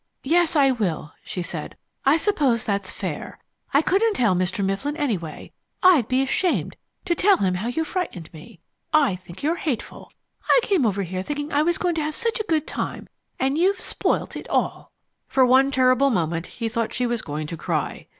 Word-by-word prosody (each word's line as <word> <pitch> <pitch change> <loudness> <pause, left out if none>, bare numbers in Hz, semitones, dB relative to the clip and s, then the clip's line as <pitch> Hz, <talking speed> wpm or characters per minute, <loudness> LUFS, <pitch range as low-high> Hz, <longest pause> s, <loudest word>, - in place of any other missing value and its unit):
"Yes, 335 +3 +2
I 275 -3 +5
will," 180 -11 -2
she 180 - -4
said. 170 - -6 0.3
"I 285 +4 +6
suppose 290 - +1
that's 200 -2 -2
fair. - - -5 0.3
I 280 +3 +4
couldn't 410 +5 +2
tell 230 - +3
Mr. 185 +2 0
Mifflin, 270 +11 -2
anyway. 200 - -3 0.3
I'd 340 - +6
be 255 +1 +2
ashamed 350 +6 0 0.3
to 345 - +2
tell 385 +3 +4
him 185 -2 +1
how 190 +5 -3
you 285 +7 -1
frightened 315 - -4
me. 170 +5 -13 0.3
I 290 - +4
think 180 +2 -12
you're 325 +4 +1
hateful. 260 -9 -4 0.4
I - - +7
came 360 - +2
over 200 -1 -1
here 185 +1 -4
thinking 290 +7 -4
I 290 - +3
was 340 +2 +2
going 355 -1 0
to 320 - -1
have 305 0 -3
such 465 0 0
a 435 - -4
good 315 -2 +2
time, - - -4 0.3
and 270 +4 +1
you've 380 +2 +2
spoilt - - -1
it - - -8
all!" - - -1 0.4
For 260 -1 +4
one 260 +2 +5
terrible 260 0 +3
moment 165 -6 -1
he 230 - -4
thought 225 0 -2
she 250 - 0
was 240 -2 -1
going 150 -2 -4
to 165 - -5
cry. - - -3
260 Hz, 195 wpm, -23 LUFS, 195-315 Hz, 0.4 s, I